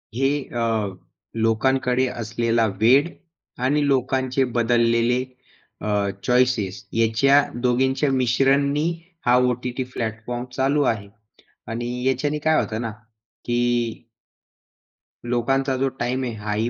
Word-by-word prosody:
हे 135 +2 +2 0.3
अ, 115 -3 0 0.5
लोकांकडे 125 +3 +1
असलेला 115 0 0 0.2
वेळ 135 +7 +5 0.6
आणि 145 +2 +2
लोकांचे 130 0 +1
बदललेले 120 +1 +2 0.6
अ, 105 -1 0
चॉईसेस, 120 -6 +1
याच्या 115 +6 +4 0.2
दोघींच्या 130 +3 +1
मिश्रणांनी 135 +4 +2 0.4
हा 120 0 +5
ओ-टी-टी 125 +1 -3
प्लॅटफॉर्म 115 +1 -4
चालू 140 +2 +2
आहे 100 -3 -1 0.6
आणि 120 +1 -3 0.2
याच्याने 145 +3 0
काय 155 +1 +2
होतं 110 +1 -3
ना 115 - -3 0.5
की 120 0 0 1.7
लोकांचा 130 +3 0
जो 135 - +1
टाईम 125 +2 -1
आहे, 120 -3 -3
हा 105 0 -5
ही 110 +3 0
125 Hz, 110 wpm, -23 LUFS, 115-135 Hz, 1.7 s, वेळ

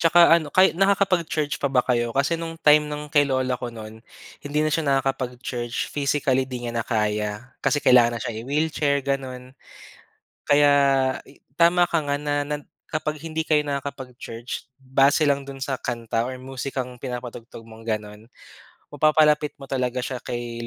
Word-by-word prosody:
Tsaka, 170 +1 +6
ano 155 - -7
kay 190 +1 +6
nakakapag-church 180 -5 +1
pa - - +1
ba 125 -2 +2
kayo? 120 -2 0
Kasi 140 +5 +1
no'ng 165 0 -5
time 150 0 +6
ng 150 0 -6
kay 145 -2 +4
lola 130 -2 0
ko 125 - -5
no'n, 110 -1 -10 0.4
hindi 145 +1 -3
na 155 - +1
siya 160 -1 0
nakakapag-church, 125 -3 -2
physically 140 -2 +1
'di 125 -1 -6
niya - - -8
na 115 -1 -2
kaya. 105 +2 -2
Kasi 145 - +1
kailangan 120 -2 +5
na 115 - -6
siya 115 -2 -4
i-wheelchair, 145 +2 0
gano'n. 130 -2 -4 0.9
Kaya 145 0 +5 0.5
i 140 - -19 0.2
tama 175 +1 +5
ka 165 -2 +1
nga 145 0 0
na 145 -1 -1
nan 150 0 -3 0.3
kapag 155 0 -2
hindi 160 0 -3
kayo 150 -1 +3
nakakapag-church, 130 -4 -6
base 135 +3 +2
lang 140 -1 +1
do'n 135 -1 -6
sa 135 -1 -3
kanta 115 -1 -2
or 130 - -5
musikang 130 -1 -5
pinapatugtog 120 -3 -7
mong 115 0 -14
gano'n, 105 0 -4 0.6
mapapalapit 150 0 +3
mo 135 -1 -12
talaga 125 -1 -1
siya 125 0 -4
kay 120 -1 -5
135 Hz, 165 wpm, -24 LUFS, 120-150 Hz, 0.9 s, Tsaka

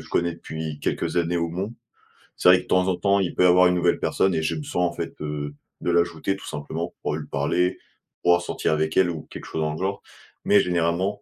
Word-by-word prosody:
je - - -13
connais 85 0 +1
depuis 80 -2 -6
quelques - - -2
années 85 0 +1
au 85 0 0
mon. 95 +5 -3 0.7
C'est - - +5
vrai 90 0 +7
que - - -21
temps 90 0 +3
en 95 - +2
temps, 100 0 +2
il 90 -3 -1
peut - - +3
y - - +6
avoir 90 0 +6
une 90 - +2
nouvelle 90 - +2
personne 95 -3 +1
et 80 - +1
je - - 0
me 150 - -5
sens 90 -12 0
en - - -9
fait, 85 -1 -5
heu, 75 -1 -4 0.3
de 85 - 0
l'ajouter 85 +2 +1
tout - - -11
simplement 80 +3 -5
pour - - -1
lui 75 -1 -5
parler, 85 +6 0 0.4
pouvoir 85 0 +4
sortir 85 - -1
avec 80 0 0
elle 95 -2 +5
ou 80 -3 -5
quelque - - -9
chose 80 - -4
dans 75 -1 0
le 75 - -6
genre. 95 +2 -2 0.4
Mais, 105 - +6
généralement, 90 +3 0
85 Hz, 245 wpm, -24 LUFS, 80-90 Hz, 0.7 s, vrai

